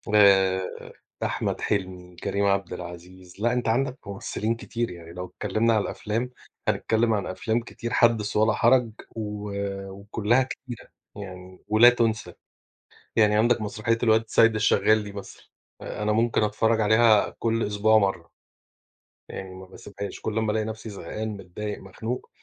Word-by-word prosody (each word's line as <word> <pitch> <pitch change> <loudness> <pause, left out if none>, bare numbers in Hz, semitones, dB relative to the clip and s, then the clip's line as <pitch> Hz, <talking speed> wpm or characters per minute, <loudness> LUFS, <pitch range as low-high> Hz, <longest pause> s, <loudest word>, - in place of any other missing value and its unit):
آآ، 95 -2 +5 0.6
أحمد - - -2
حلمي، 90 -3 -3
كريم 100 +3 -1
عبد 100 -2 +1
العزيز، 90 +2 -10
لأ، 120 +2 +2
أنت 125 -1 -1
عندك 130 +3 +1
ممثلين 105 +3 -2
كتير 115 0 -3
يعني 85 -1 -11
لو 90 +1 -5
اتكلمنا 105 +5 0
على 110 - +3
الأفلام 115 +4 -3 0.4
هنتكلم 115 0 +2
عن 105 -2 -1
أفلام 110 +5 -1
كتير، 115 0 -6
حدِّث 110 -4 +3
ولا 110 +1 +4
حرج، 120 0 +3 0.2
و 105 -2 -5 0.4
وكلّها 105 +5 +1
كتيرة، 130 -2 -9 0.3
يعني، 95 -2 -10
ولا 110 +3 +7
تُنسى. 115 -2 0 0.8
يعني 105 -1 +4
عندك 120 +1 +3
مسرحية 110 +2 -1
الواد 110 -1 +4
سيد 115 0 +4
الشغال 110 0 +3
دي 105 - -7
مثلًا، 100 -1 -10 0.4
آآ، 105 - -5
أنا 105 - +1
ممكن 115 +1 +2
أتفرج 110 +1 +2
عليها 110 0 +5
كُل 115 0 0
أسبوع 105 +2 +3
مرّة، 95 -5 0 1.0
يعني 95 -1 -7
ما 95 0 -10
باسيبهاش، 100 +1 -8
كل 110 0 -2
أمّا 110 -1 +1
ألاقي 110 0 0
نفسي 110 +1 -6
زهقان، 110 +2 -5
متضايق، 100 +2 -6
مخنوق. 110 +6 -5
105 Hz, 145 wpm, -25 LUFS, 100-115 Hz, 1.0 s, ولا